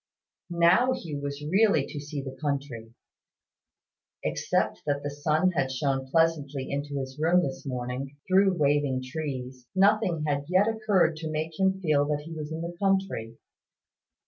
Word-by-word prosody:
Now 175 Hz, +9 st, +4 dB
Hugh 160 Hz, -, -5 dB
was 140 Hz, +1 st, -5 dB
really 190 Hz, -3 st, +3 dB
to 150 Hz, -, -7 dB
see 145 Hz, -1 st, -5 dB
the 135 Hz, -1 st, -7 dB
country. 135 Hz, -6 st, -3 dB, 1.3 s
Except -, -, 0 dB
that 145 Hz, -1 st, 0 dB
the 145 Hz, -, -3 dB
sun 155 Hz, +5 st, +1 dB
had 135 Hz, -6 st, 0 dB
shone 135 Hz, 0 st, -1 dB
pleasantly 145 Hz, -3 st, +1 dB
into 140 Hz, 0 st, -3 dB
his 130 Hz, +1 st, -6 dB
room 170 Hz, +3 st, +4 dB
in 140 Hz, -, -1 dB
the -, -, -11 dB
morning, 130 Hz, +2 st, -4 dB
through 190 Hz, 0 st, +4 dB
waving 145 Hz, -3 st, +1 dB
trees, 130 Hz, -3 st, -5 dB
nothing 195 Hz, -4 st, +3 dB
had 145 Hz, -1 st, -1 dB
yet 185 Hz, +4 st, +3 dB
occurred 210 Hz, -7 st, +2 dB
to 160 Hz, 0 st, -4 dB
make 155 Hz, +2 st, -3 dB
him 190 Hz, 0 st, +2 dB
feel 150 Hz, -5 st, +2 dB
that 150 Hz, -1 st, -1 dB
he 165 Hz, +2 st, -9 dB
was 155 Hz, -1 st, -6 dB
in 160 Hz, +1 st, -4 dB
the 170 Hz, +1 st, -5 dB
country. 190 Hz, -, 0 dB
150 Hz, 160 wpm, -27 LUFS, 140-175 Hz, 1.3 s, Now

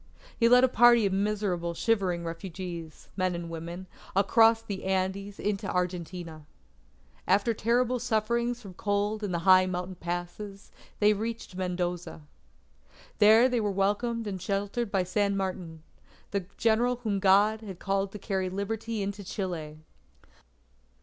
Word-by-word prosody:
He 230 Hz, -1 st, +3 dB
led 250 Hz, +1 st, +7 dB
a -, -, +7 dB
party 240 Hz, -2 st, +5 dB
of 195 Hz, -, 0 dB
miserable 195 Hz, -4 st, -1 dB
shivering 185 Hz, -5 st, 0 dB
refugees, 170 Hz, -1 st, -7 dB
men 185 Hz, -2 st, 0 dB
and 170 Hz, -1 st, -6 dB
women, 170 Hz, +3 st, -6 dB, 0.3 s
across 225 Hz, +3 st, +4 dB
the 200 Hz, -4 st, -6 dB
Andes 190 Hz, +1 st, -2 dB
into 205 Hz, -1 st, -2 dB
Argentina. 175 Hz, -3 st, -4 dB, 0.8 s
After 200 Hz, +5 st, +3 dB
terrible 240 Hz, +3 st, +1 dB
sufferings 235 Hz, +1 st, -1 dB
from 195 Hz, -3 st, -10 dB
cold 205 Hz, +3 st, -1 dB
in 200 Hz, -, -2 dB
the 175 Hz, -, 0 dB
high 185 Hz, -1 st, +7 dB
mountain 180 Hz, 0 st, -3 dB
passes, 175 Hz, +3 st, -6 dB, 0.3 s
they 210 Hz, 0 st, +4 dB
reached 220 Hz, -2 st, -5 dB
Mendoza. 180 Hz, -3 st, -3 dB, 1.0 s
There 220 Hz, +3 st, +7 dB
they 245 Hz, -3 st, 0 dB
were 210 Hz, -, 0 dB
welcomed 210 Hz, +4 st, 0 dB
and 190 Hz, -3 st, -4 dB
sheltered 205 Hz, +4 st, -2 dB
by 195 Hz, -2 st, +1 dB
San 200 Hz, +2 st, 0 dB
Martin, 180 Hz, -4 st, -4 dB, 0.5 s
the 200 Hz, -3 st, -2 dB
General 235 Hz, +2 st, +2 dB
whom 205 Hz, -3 st, 0 dB
God 205 Hz, +3 st, +4 dB
had 195 Hz, -5 st, -8 dB
called 195 Hz, +1 st, -1 dB
to -, -, -5 dB
carry 190 Hz, -2 st, -2 dB
Liberty 210 Hz, +3 st, -3 dB
into 200 Hz, +1 st, -4 dB
Chile. 175 Hz, -6 st, -5 dB
195 Hz, 140 wpm, -28 LUFS, 180-220 Hz, 1.0 s, led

